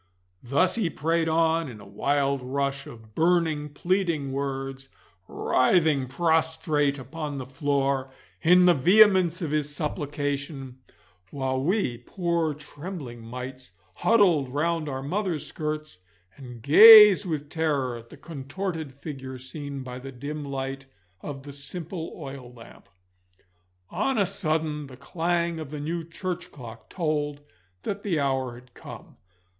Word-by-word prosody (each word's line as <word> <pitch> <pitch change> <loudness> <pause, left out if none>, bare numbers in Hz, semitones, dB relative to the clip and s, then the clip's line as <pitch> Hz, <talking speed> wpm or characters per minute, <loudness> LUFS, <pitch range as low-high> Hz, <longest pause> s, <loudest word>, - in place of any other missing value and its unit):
Thus 145 +9 +2
he 215 -7 0
prayed 165 +1 0
on 165 -1 +2
in 110 -4 -10
a 100 - -12
wild 140 +7 0
rush 135 +2 -2
of 110 -5 -13
burning, 160 -2 +1
pleading 170 -2 -1
words, 135 0 -4 0.4
writhing 145 -1 +2
prostrate 160 -1 +1
upon 145 +2 -6
the 130 - -5
floor 135 0 0 0.3
in 180 +2 +6
the 180 - +7
vehemence 185 +2 +5
of 155 - -3
his 150 -1 -1
supplication, 145 -3 -4 0.5
while 130 0 -2
we, 160 - 0
poor 170 +2 -1
trembling 145 -4 -8
mites, 125 -2 -8 0.2
huddled 180 - +3
round 155 +2 -1
our 135 -1 -4
mother's 175 0 -2
skirts 155 - -5 0.4
and 125 -4 -11
gazed 210 - +10
with 150 -3 -4
terror 145 -7 0
at 115 0 -11
the - - -13
contorted 160 0 -5
figure 135 -3 -7
seen 140 +1 -6
by 125 0 -7
the 135 +1 -8
dim 145 +4 -6
light 135 -1 -5 0.3
of 135 -2 -7
the 140 0 -9
simple 165 +4 -6
oil 135 -5 -8
lamp. 115 -4 -15 1.0
On 270 -2 0
a 200 - +3
sudden 155 -6 -2
the 130 -2 -12
clang 170 +3 -1
of 155 -3 -6
the 150 0 -6
new 165 +3 -3
church 175 +2 -5
clock 115 -4 -11
told 150 -4 -2 0.4
that 200 0 -3
the 180 -7 0
hour 135 -3 -1
had 125 +1 -16
come. - - -12
145 Hz, 135 wpm, -26 LUFS, 135-165 Hz, 1.0 s, gazed